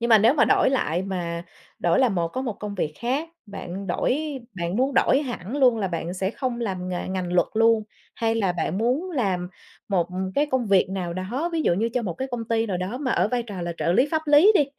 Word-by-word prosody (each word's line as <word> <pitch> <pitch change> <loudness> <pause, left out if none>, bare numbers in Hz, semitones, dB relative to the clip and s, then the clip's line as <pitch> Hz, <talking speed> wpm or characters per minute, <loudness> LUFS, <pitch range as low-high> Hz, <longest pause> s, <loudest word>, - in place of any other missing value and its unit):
Nhưng 235 - 0
mà 225 -2 +8
nếu 225 +6 +5
mà 305 - +5
đổi - - +3
lại 180 - 0
mà 175 -3 -3 0.4
đổi 170 -1 +2
là 260 - +5
một 175 -5 0
có 260 +9 -4
một 240 - -2
công 205 0 -6
việc 155 -5 -2
khác, 270 +7 -1 0.2
bạn 195 -1 -7
đổi 245 +8 0 0.4
bạn 170 +2 -2
muốn 265 +3 +1
đổi 270 +1 +4
hẳn 245 -2 -5
luôn 250 -5 +4
là 195 - -1
bạn 170 0 -4
sẽ 190 +1 -1
không 245 0 -3
làm 185 -5 -3
nghề 180 0 -3
ngành 185 -2 -3
luật 180 - +3
luôn, 225 0 +4 0.3
hay 225 -1 0
là 200 -5 +1
bạn 175 +2 -2
muốn 265 +11 0
làm 190 - -1 0.4
một 180 -4 +1 0.3
cái 290 - +2
công 260 -4 0
việc 195 -2 +3
nào 185 -3 -3
đó, 220 - -2
ví 325 -1 0
dụ 170 - +3
như 225 +5 0
cho 250 - +1
một 185 -6 -3
cái 265 +7 -4
công 240 -2 -3
ty 225 0 +1
nào 195 -4 -1
đó 185 +7 -3
mà 265 -3 -2
ở - - +2
vai 245 +1 0
trò 200 -6 -6
là 170 0 -3
trợ 170 - +1
lý 255 +9 +4
pháp 315 -1 0
lý 300 +8 +7
đi, 300 - +5
215 Hz, 250 wpm, -24 LUFS, 180-255 Hz, 0.4 s, mà